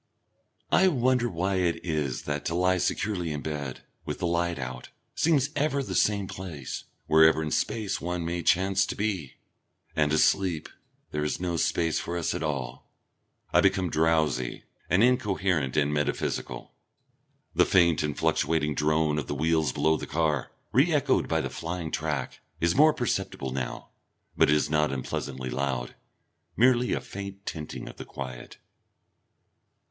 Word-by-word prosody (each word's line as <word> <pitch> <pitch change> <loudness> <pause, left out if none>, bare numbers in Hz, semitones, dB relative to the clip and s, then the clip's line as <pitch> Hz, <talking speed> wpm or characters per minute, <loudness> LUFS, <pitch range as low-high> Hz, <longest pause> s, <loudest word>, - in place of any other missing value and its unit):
I 190 - +5
wonder 125 -6 +2
why 95 +1 -1
it 90 -1 0
is 75 -6 -1
that 75 0 -3
to 85 - -1
lie 90 +1 +2
securely 90 -4 -1
in 75 -1 -3
bed, 70 -4 -4 0.2
with - - -4
the - - -2
light 85 0 0
out, 65 -2 -6 0.2
seems 150 -3 +2
ever 140 -1 +1
the - - -5
same 100 -2 +2
place, 90 -8 -6 0.2
wherever 80 0 +5
in 75 - -3
space 110 -4 -1
one 85 0 -2
may 85 +1 -2
chance 95 +3 +3
to - - -4
be? 100 -10 -2 0.6
And 75 -1 +2
asleep, 85 +1 +2 0.4
there 75 0 -1
is 75 - -1
no 90 -1 -1
space 80 -1 +1
for 85 +1 -4
us 85 - -1
at - - -3
all. 65 -4 -4 0.6
I - - +6
become 95 -3 +2
drowsy 80 -6 +1 0.3
and 90 +4 +4
incoherent 95 - +1
and 75 0 +2
metaphysical.... 75 -1 -2 0.8
The - - +5
faint 85 -4 +4
and 75 -2 -2
fluctuating 75 -2 +1
drone 75 0 +1
of 70 - -5
the 70 - -3
wheels 80 -1 +1
below 80 +4 +2
the - - -6
car, 75 -3 0 0.2
re - - +4
echoed - - +2
by - - +1
the - - -3
flying 85 -1 -4
track, - - -2 0.2
is 85 0 +2
more 155 +3 +6
perceptible 120 - -2
now, 65 -2 -4 0.5
but - - +4
it 75 - +5
is 75 - +1
not 75 -1 +1
unpleasantly 65 -1 -4
loud, 65 -3 -2 0.6
merely 125 +1 +4
a - - -1
faint 100 0 -8
tinting 75 -2 -6
of - - -10
the - - -7
quiet.... 65 -3 -8
80 Hz, 160 wpm, -27 LUFS, 75-95 Hz, 0.8 s, I